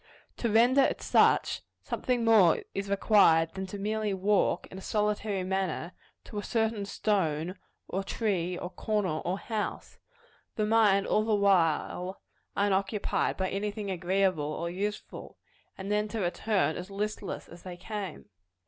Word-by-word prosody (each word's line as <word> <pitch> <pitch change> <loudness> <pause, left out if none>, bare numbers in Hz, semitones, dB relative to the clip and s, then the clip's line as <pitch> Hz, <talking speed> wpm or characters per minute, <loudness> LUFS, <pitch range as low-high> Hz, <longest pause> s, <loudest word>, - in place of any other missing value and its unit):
To 235 - -1
render 240 +5 +5
it - - +1
such, - - +3 0.2
something 245 -2 -1
more 205 -8 +5
is 195 0 -3
required 195 -5 +4
than 190 0 -5 0.2
merely 215 0 -1
to - - -3
walk, 200 +2 +2
in 190 - -8
a - - -10
solitary 210 -1 -1
manner, 185 -3 -2 0.3
to 210 - -6
a - - -5
certain 220 -3 0
stone, 180 -6 0 0.3
or 195 +1 -2
tree, 185 -5 -1
or 180 - -6
corner, 190 -5 -1
or 180 +2 -2
house 215 0 -4 0.6
the 215 - 0
mind 210 -3 +4
all 215 - +2
the 220 -1 +2
while 185 -1 +1 0.4
unoccupied 200 0 0
by 190 -1 -1
any 205 +2 -1
thing 205 -1 -5
agreeable 185 -2 +1
or 170 +2 -3
useful 205 +3 -5 0.4
and 195 +1 -5
then 210 0 +1
to 220 +1 -4
return 190 -1 0
as 180 +2 -7
listless 205 0 -4
as 170 +1 -13
they 180 -1 -8
came. 200 -2 -6
200 Hz, 150 wpm, -29 LUFS, 185-210 Hz, 0.6 s, render